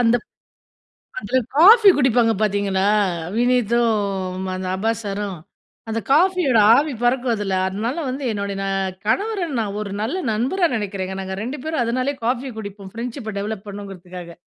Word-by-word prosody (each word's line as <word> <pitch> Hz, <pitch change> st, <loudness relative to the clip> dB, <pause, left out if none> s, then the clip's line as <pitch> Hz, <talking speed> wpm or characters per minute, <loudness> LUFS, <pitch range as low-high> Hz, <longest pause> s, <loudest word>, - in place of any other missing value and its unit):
அந்தப் 240 Hz, 0 st, +2 dB, 0.9 s
அதுல 260 Hz, -, 0 dB, 0.2 s
காபி 410 Hz, +6 st, +8 dB
குடிப்பாங்க 240 Hz, -4 st, +3 dB
பாத்தீங்களா, 200 Hz, -2 st, +1 dB, 0.5 s
வினீத்தும் 215 Hz, -6 st, +1 dB
அந்த 185 Hz, 0 st, -4 dB
அப்பாஸ் 225 Hz, +3 st, -1 dB
சாரும், 200 Hz, -3 st, -4 dB, 0.5 s
அந்த 225 Hz, +1 st, -1 dB
காபியோட 340 Hz, -6 st, +4 dB, 0.2 s
ஆவி 295 Hz, 0 st, +1 dB
பறக்கும் 245 Hz, 0 st, +2 dB
அதுல, 195 Hz, -2 st, -2 dB
அதனால 220 Hz, -, -3 dB
வந்து 265 Hz, +2 st, -4 dB
என்னுடைய 200 Hz, -1 st, -3 dB
நா 195 Hz, -, -2 dB, 0.4 s
கணவர 395 Hz, -, 0 dB
நான் 205 Hz, -2 st, -3 dB
ஒரு 200 Hz, -2 st, -6 dB
நல்ல 245 Hz, +11 st, -2 dB, 0.2 s
நண்பரா 275 Hz, -, +1 dB
நினைக்கிறேங்க. 190 Hz, -2 st, -4 dB
நாங்க 190 Hz, 0 st, -5 dB
2 265 Hz, +6 st, -4 dB
பேரும் 315 Hz, -5 st, -1 dB
அதனாலயே 255 Hz, +4 st, -1 dB
காபி 255 Hz, +1 st, -1 dB
குடிப்போம் 200 Hz, -2 st, -8 dB
பிரண்ட்ஷிப்ப 235 Hz, -1 st, -5 dB
டெவலப் 210 Hz, 0 st, -5 dB
பண்ணுங்கிறதுக்காக. 180 Hz, -4 st, -9 dB
225 Hz, 135 wpm, -21 LUFS, 200-255 Hz, 0.9 s, காபி